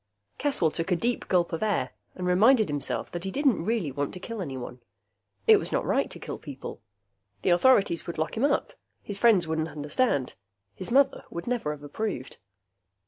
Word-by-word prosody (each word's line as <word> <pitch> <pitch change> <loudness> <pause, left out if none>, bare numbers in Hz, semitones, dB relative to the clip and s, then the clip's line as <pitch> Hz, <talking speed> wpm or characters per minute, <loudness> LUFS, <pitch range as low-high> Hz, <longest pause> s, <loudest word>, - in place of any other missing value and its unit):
Caswell 265 - +2
took 165 +4 -3
a - - +5
deep 235 +7 -1
gulp 175 -2 +2
of 165 - -2
air 215 -2 0 0.2
and 180 - -4
reminded 215 - +5
himself 145 -1 -2
that 175 0 -5
he 195 - -2
didn't 270 - +1
really 210 -7 0
want 145 +4 -3
to - - -7
kill 225 +2 -6
anyone. 130 -5 -6 0.6
It - - +8
was - - -2
not - - 0
right - - +1
to - - -6
kill - - -6
people. - - -8 0.6
The - - +3
authorities 185 -3 +4
would 170 - -5
lock 155 - -2
him 225 - -1
up, 280 0 +1 0.3
his 200 -1 -5
friends 205 -8 +5
wouldn't 160 0 -1
understand, 145 - 0 0.4
his 185 - -6
mother 270 +2 +3
would 170 - -6
never 240 -10 -1
have 150 -1 -8
approved. 145 - -4
180 Hz, 190 wpm, -27 LUFS, 155-230 Hz, 0.6 s, It